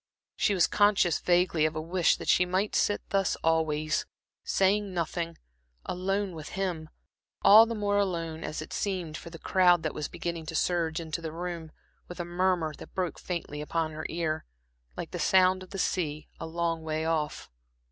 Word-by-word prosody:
She 205 - +2
was 180 - +5
conscious 205 -5 +3
vaguely 175 -3 +2
of 155 - -6
a - - -1
wish 170 +2 +2
that - - -8
she 180 - +5
might 185 +3 0
sit 205 - +2
thus 195 -1 +1
always, 155 -1 +1 0.4
saying 195 0 +1
nothing, 170 0 -2 0.5
alone 195 +1 -1
with 155 -2 -8
him 175 -5 -2 0.5
all 220 +3 +9
the 230 - -3
more 205 -1 +1
alone 165 -5 -2
as 155 0 -4
it - - -10
seemed 180 -6 -2
for 170 - -8
the 165 - -9
crowd 180 0 +4
that 155 - -2
was 150 - -3
beginning 170 -2 -5
to 165 - -5
surge 165 -1 +1
into 165 0 -4
the 160 -1 -4
room, 170 -1 -5 0.4
with 175 - -9
a 175 - -2
murmur 175 -2 0
that - - -12
broke 180 -2 -2
faintly 165 -4 -4
upon 160 +1 -1
her 155 0 -5
ear, 160 -2 -2 0.5
like - - -5
the - - -4
sound 185 0 +4
of 185 - -10
the 195 - -6
sea 155 -5 -1
a - - -5
long 165 0 -1
way 160 0 -2
off. 160 -2 -2
170 Hz, 185 wpm, -29 LUFS, 160-185 Hz, 0.5 s, all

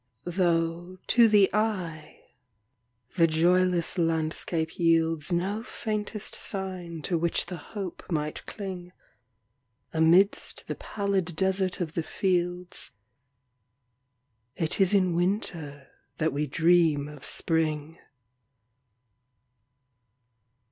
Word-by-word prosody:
Though, 170 0 0
to 235 -2 +5
the 205 -3 +5
eye, 180 -8 -2 1.0
the 165 -1 +6
joyless 175 +2 +2
landscape 160 0 0
yieldsNo 165 +5 +1
faintest 215 -2 -4
sign 185 -5 -5
to 170 0 0
which 170 0 +1
the 180 0 -6
hope 185 +3 -7
might 150 -2 -2
cling,—Amidst 160 - -2
the - - -3
pallid 195 -4 -2
desert 190 0 +1
of 165 -3 -3
the 165 - -1
fields,—It 125 - -5
is 195 +1 +4
in 185 -3 +2
Winter 170 -7 -2 0.3
that 160 -3 0
we 150 +1 -1
dream 160 -1 +3
of 150 -2 -11
Spring. 160 -1 0
165 Hz, 85 wpm, -27 LUFS, 150-185 Hz, 1.0 s, the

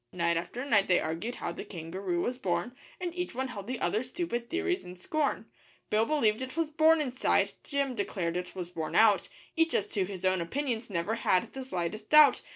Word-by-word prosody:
Night 170 -1 +1
after 235 +10 -3
night 210 -8 +3
they 180 - +4
argued 170 +10 -3
how - - -4
the - - -6
kangaroo 175 +1 -3
was 250 +5 -2
born, 180 +6 -1 0.2
And 355 -2 -3
each 355 -6 -4
one 260 +1 -2
held 200 -4 -7
the 255 0 -3
other's 230 +4 0
stupid 240 -8 -3
theories 365 +1 -1
in 180 0 -9
scorn, 295 - -1 0.5
Bill 220 +2 +3
believed 230 -7 +2
it 260 +4 -6
was 325 -2 0
'born 320 +1 +5
inside,' 255 -3 +1
Jim 280 -2 -1
declared 185 -6 -2
it 180 +1 -4
was 180 -2 -5
born 160 -3 -4
out 220 -3 +5 0.3
Each 325 -1 +2
as 205 - +2
to 195 -2 0
his 190 -1 -6
own 185 -1 +2
opinions 240 - -2
never 185 +3 -1
had 180 - +2
the 265 - -5
slightest 215 -1 -4
doubt. 300 -4 +7
220 Hz, 205 wpm, -30 LUFS, 180-280 Hz, 0.5 s, doubt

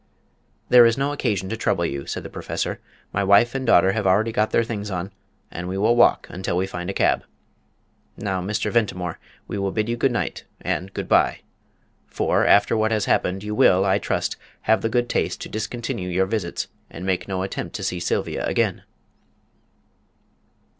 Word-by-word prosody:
"There 120 -1 +8
is 115 +2 +1
no 140 +1 0
occasion 100 -10 -1
to 115 - -2
trouble 85 -6 0
you," 70 -3 -4
said - - -4
the - - -7
Professor; - - -3 0.3
"my 100 - +1
wife 100 +5 +5
and 135 -2 -3
daughter 95 -2 +5
have 105 -1 -1
already 105 +5 +3
got 105 0 +1
their 115 - +2
things 105 -3 -4
on, 95 0 -4 0.4
and 90 +1 -5
we 95 +1 -3
will 110 +4 +3
walk 120 - +4
until 90 -1 -2
we 95 - +1
find 90 -2 -5
a - - -2
cab. - - +2 0.9
Now, 95 -3 -2
Mr. 105 +4 -2
Ventimore, 90 -7 -1 0.3
we 100 - -4
will 100 0 0
bid 110 +1 -1
you 120 - 0
good 130 +2 +1
night 120 - -2 0.2
and 95 +2 -3
good - - -5
bye. - - +3 0.7
For, - - +1
after 100 +2 +5
what 110 0 +2
has 110 -2 0
happened, 95 +2 0
you 105 0 -4
will, 95 -2 +4
I 95 +1 +3
trust, - - -2 0.2
have 110 - +2
the 115 - 0
good 120 +1 +1
taste - - -1
to - - -6
discontinue 110 -2 -4
your 95 +2 +2
visits 95 -4 -3 0.2
and 85 - -8
make 95 -1 -1
no 95 -1 -2
attempt 95 - -5
to - - -4
see 90 - -2
Sylvia 85 - -1
again." - - 0
100 Hz, 190 wpm, -23 LUFS, 95-115 Hz, 0.9 s, There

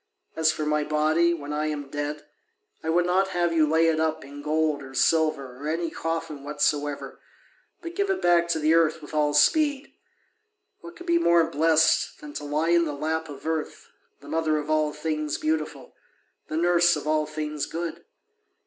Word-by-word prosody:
As 160 -1 +3
for 155 - -4
my 150 0 +1
body, 155 +3 +2
when 150 -3 -4
I 150 +1 -1
am 145 -2 -4
dead, 145 +1 -4 0.6
I 160 - -3
would 175 +2 +2
not 185 +2 +2
have 175 -1 +1
you 155 -2 +3
lay 160 +1 +3
it 160 -1 +1
up 160 -3 -1
in 145 +1 -10
gold 155 -1 0
or 135 -1 -11
silver 155 -5 +1
or 150 - -3
any 165 +1 -2
coffin 165 -3 -4
whatsoever, 145 0 -2 0.6
but 335 0 -6
give 400 +1 -1
it 385 - 0
back 175 -1 +3
to 170 - 0
the 155 +1 +3
earth 165 -1 +3
with 150 - -11
all 150 -1 +1
speed. 290 - +2 0.9
What 345 - -11
could 350 - -11
be 340 -1 +3
more 170 - +4
blessed 160 +1 +2
than 295 0 -10
to 145 - -6
lie 150 +3 0
in 170 0 +4
the 150 - -3
lap 160 +2 -2
of 140 0 -10
Earth, 160 -1 -4 0.3
the - - -14
mother 160 -1 0
of 150 +1 -3
all 155 -1 +2
things 155 0 -3
beautiful, 155 0 -3 0.5
the 155 - -3
nurse 175 0 +4
of 150 - -6
all 155 0 +1
things 150 -1 -4
good? 170 0 -5
155 Hz, 190 wpm, -25 LUFS, 150-170 Hz, 0.9 s, more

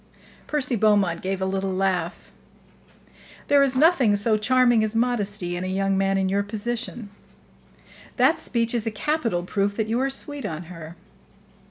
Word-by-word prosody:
Percy 285 -4 0
Beaumont 200 -5 +2
gave 190 0 -3
a - - 0
little 190 0 -2
laugh. 185 -2 -2 1.2
"There 285 -1 +5
is 270 -2 +2
nothing 275 -8 +4
so 215 +2 +3
charming 240 +1 +3
as 215 +1 -1
modesty 205 -7 -1
in 175 - -4
a - - -3
young 195 +1 0
man 195 0 +1
in 190 0 0
your 200 +2 +1
position. 225 +1 -5 1.1
That - - +3
speech 230 -1 -1
is 235 -2 -1
a - - 0
capital 230 - -1
proof 200 +2 -1
that 220 - 0
you 225 +3 -1
are 270 - 0
sweet 285 +1 -2
on 170 -4 -5
her." 165 0 -10
210 Hz, 165 wpm, -24 LUFS, 190-240 Hz, 1.2 s, There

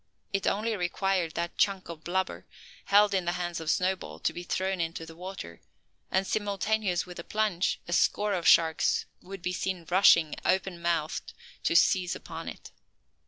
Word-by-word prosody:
It 195 -1 0
only 215 +3 0
required 180 -2 -1
that 170 0 -3
"chunk" 195 -2 +1
of 165 -2 -9
blubber, 190 +2 -2 0.4
held 205 0 +5
in 190 -2 +1
the 175 - 0
hands 175 -2 -3
of 160 -1 -4
Snowball, 185 +1 0
to - - 0
be 175 - -6
thrown 185 +1 -1
into 165 0 -3
the 165 0 -12
water, 180 - -8 0.5
and 190 +1 +1
simultaneous 205 -2 0
with 180 -1 -10
the 170 - -6
plunge 210 -4 0
a 175 - -3
score 205 +3 +2
of 175 -3 -1
sharks 160 -1 +4 0.2
would 195 -1 -9
be 180 - -1
seen 180 -2 -3
rushing, 170 -4 +6
open 185 -2 0
mouthed, 165 -3 -1 0.3
to - - +2
seize 180 +1 +4
upon - - -7
it. - - -11
180 Hz, 170 wpm, -28 LUFS, 170-195 Hz, 0.5 s, rushing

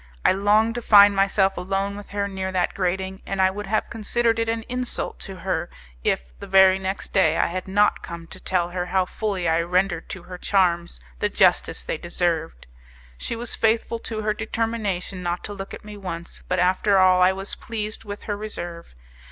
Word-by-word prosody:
I - - +7
longed 210 +4 +3
to 240 - -4
find 205 -2 +7
myself 195 0 +2
alone 195 +2 -2
with 205 0 -10
her 200 0 -1
near 190 -1 -4
that 180 -1 +1
grating, 190 +1 -2
and 195 - -3
I 190 0 +4
would 205 +1 -6
have 215 +2 -1
considered 230 +1 0
it 230 0 0
an 225 0 -1
insult 250 +1 -4
to 195 - -5
her 175 -2 -2 0.3
if, - - -1
the - - -8
very 190 0 +6
next 190 +1 -4
day, 190 - +4
I - - +3
had 185 +2 -4
not 205 +2 +3
come 170 0 -8
to 185 +3 -8
tell 175 -2 0
her 180 0 -3
how 185 0 +2
fully 195 -3 -2
I 165 +1 +3
rendered 180 0 0
to 185 - -7
her 180 0 -9
charms 175 - +1 0.2
the - - +1
justice - - +2
they 155 - -3
deserved. 170 -2 -2 0.5
She - - -3
was 235 +1 -3
faithful 225 +1 +1
to 220 -1 -5
her 215 0 +1
determination 215 -4 -2
not 175 0 -2
to 205 - -5
look 195 -1 -7
at - - -9
me 210 -1 -9
once, 170 -3 -7
but 185 - 0
after 185 +3 +3
all 185 -1 +5
I 180 +1 +6
was 195 +1 -5
pleased 215 -3 -5
with 205 -1 -7
her 205 - -2
reserve. 175 - -7
195 Hz, 200 wpm, -24 LUFS, 180-210 Hz, 0.5 s, I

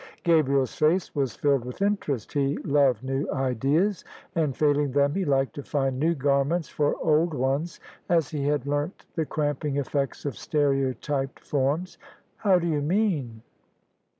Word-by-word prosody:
Gabriel's 140 -6 +3
face 165 +4 +1
was 135 -6 -1
filled 140 -4 +1
with 125 0 -8
interest: 195 - -1
he 140 0 +1
loved 140 -5 +3
new 135 +2 -2
ideas; 140 - +1 0.3
and, 155 -6 0
failing 145 -2 +2
them, 140 +1 +2
he 195 - 0
liked 135 -4 +1
to 145 - -6
find 135 -2 -1
new 165 +3 +2
garments 140 +4 +1
for 145 -1 0
old 160 0 +2
ones, 140 +6 -1 0.3
as 165 -4 +2
he 145 -2 -2
had 145 -3 0
learnt 145 +4 -2
the 160 -3 -2
cramping 145 -1 -1
effects 140 0 -2
of 140 - -2
stereotyped 135 -1 -1
forms. 145 +6 -1 0.2
" - - -37
How 195 -4 +4
do 175 - -1
you 155 -3 0
mean 150 - 0
145 Hz, 155 wpm, -26 LUFS, 135-160 Hz, 0.3 s, How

